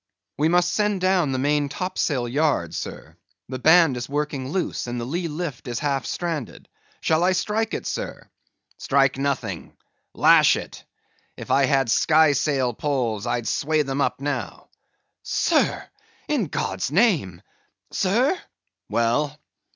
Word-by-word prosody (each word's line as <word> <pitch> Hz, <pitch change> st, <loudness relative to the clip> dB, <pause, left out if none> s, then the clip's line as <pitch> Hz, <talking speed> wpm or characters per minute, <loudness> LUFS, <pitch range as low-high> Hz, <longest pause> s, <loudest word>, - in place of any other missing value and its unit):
_ -, -, -63 dB, 0.4 s
"We 155 Hz, +2 st, +3 dB
must 175 Hz, +1 st, +2 dB
send 210 Hz, -2 st, +1 dB
down 185 Hz, -5 st, +2 dB
the 130 Hz, -, -1 dB
main 145 Hz, +2 st, +1 dB
top 185 Hz, +4 st, -4 dB
sail 130 Hz, -6 st, 0 dB
yard, 130 Hz, -, 0 dB
sir. -, -, -7 dB, 0.3 s
The 130 Hz, -1 st, -5 dB
band 160 Hz, -1 st, +5 dB
is 120 Hz, +1 st, -5 dB
working 145 Hz, -2 st, -2 dB
loose 175 Hz, -5 st, -2 dB
and 120 Hz, 0 st, -3 dB
the 120 Hz, -, -4 dB
lee 170 Hz, +7 st, -2 dB
lift 150 Hz, -5 st, -5 dB
is 120 Hz, -1 st, -3 dB
half 140 Hz, -3 st, -1 dB
stranded. 165 Hz, -8 st, -4 dB, 0.3 s
Shall 160 Hz, +1 st, +2 dB
I 185 Hz, +1 st, +3 dB
strike 215 Hz, +4 st, -1 dB
it, -, -, -5 dB
sir?" -, -, -5 dB, 0.5 s
"Strike 135 Hz, -1 st, +2 dB
nothing; 140 Hz, -1 st, -3 dB, 0.4 s
lash -, -, +6 dB
it. -, -, -8 dB, 0.5 s
If -, -, -7 dB
I 135 Hz, 0 st, +4 dB
had 135 Hz, -3 st, +2 dB
sky 155 Hz, +2 st, +4 dB
sail 135 Hz, -4 st, 0 dB
poles, 120 Hz, -5 st, -2 dB
I'd 120 Hz, -2 st, -1 dB
sway 155 Hz, +1 st, +1 dB
them 135 Hz, 0 st, -2 dB
up -, -, 0 dB
now." 140 Hz, -6 st, -4 dB, 0.5 s
"Sir!—in -, -, -1 dB
God's 95 Hz, +7 st, -3 dB
name!—sir?" 190 Hz, -, 0 dB, 0.5 s
"Well." 130 Hz, +6 st, 0 dB
145 Hz, 145 wpm, -23 LUFS, 130-170 Hz, 0.5 s, lash